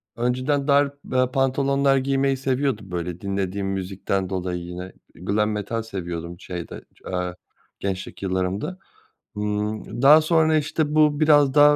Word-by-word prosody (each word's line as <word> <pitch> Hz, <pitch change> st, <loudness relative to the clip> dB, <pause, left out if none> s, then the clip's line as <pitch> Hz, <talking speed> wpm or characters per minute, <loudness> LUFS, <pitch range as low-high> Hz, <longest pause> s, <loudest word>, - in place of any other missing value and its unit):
önceden 130 Hz, +4 st, 0 dB
dar, 140 Hz, 0 st, +4 dB, 0.2 s
eee, 130 Hz, 0 st, +3 dB
pantolonlar 135 Hz, +1 st, +2 dB
giymeyi 135 Hz, 0 st, +1 dB
seviyordum 130 Hz, -6 st, -1 dB
böyle 90 Hz, 0 st, -4 dB
dinlediğim 100 Hz, 0 st, -2 dB
müzikten 95 Hz, 0 st, -2 dB
dolayı 90 Hz, -1 st, -2 dB
yine. 90 Hz, +2 st, -7 dB, 0.2 s
Glam 105 Hz, +4 st, 0 dB
Metal 105 Hz, +2 st, -2 dB
seviyordum 85 Hz, -5 st, -6 dB
şeyde, 90 Hz, -2 st, -7 dB, 0.3 s
eee, 90 Hz, -1 st, -2 dB, 0.4 s
gençlik 95 Hz, 0 st, -4 dB
yıllarımda. 95 Hz, -, -2 dB, 0.6 s
Imm, 105 Hz, +2 st, -3 dB
daha 150 Hz, +3 st, +8 dB
sonra, 160 Hz, 0 st, +3 dB
işte, 150 Hz, 0 st, -1 dB
bu 150 Hz, -1 st, +4 dB
biraz 145 Hz, -3 st, +5 dB
daha, 145 Hz, +1 st, +7 dB
110 Hz, 130 wpm, -23 LUFS, 95-140 Hz, 0.6 s, daha